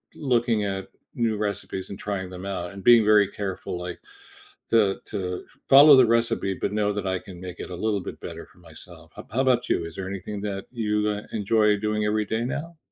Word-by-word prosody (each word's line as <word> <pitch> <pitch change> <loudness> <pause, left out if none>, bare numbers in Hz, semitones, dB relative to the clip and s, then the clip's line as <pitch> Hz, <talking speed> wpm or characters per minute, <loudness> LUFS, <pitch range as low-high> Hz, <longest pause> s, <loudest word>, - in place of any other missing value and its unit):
looking 120 -5 +1
at 95 -1 -3 0.3
new 115 -2 +1
recipes 100 -2 -4
and 100 - -8
trying 95 -3 -4
them 90 +1 -8
out 90 -2 -4
and 100 - -9
being 120 -2 +7
very 105 -1 +5
careful, 95 -3 -5
like, 90 0 -6 0.7
to 105 -4 +3
to 90 -3 -4 0.2
follow 140 +2 +9
the 130 -2 +7
recipe, 115 -4 +1
but 100 - -3
know 105 -1 +1
that 100 -1 -3
I 95 0 0
can 90 -2 -12
make 90 -1 -8
it - - -7
a - - -4
little 105 -3 +1
bit - - -8
better - - -8
for - - -24
myself. 80 -3 -14
How - - -8
b - - -28
how 130 - +2
about 125 -2 +2
you, - - +1
is 85 - -9
there 95 -1 -5
anything 100 +1 -5
that 100 -1 -4
you, 110 -4 -1
uh, 105 0 -3
enjoy 105 0 +2
doing 105 0 -1
every 105 0 +1
day 110 +3 -2
now? 160 +6 -5
105 Hz, 220 wpm, -25 LUFS, 95-115 Hz, 0.7 s, follow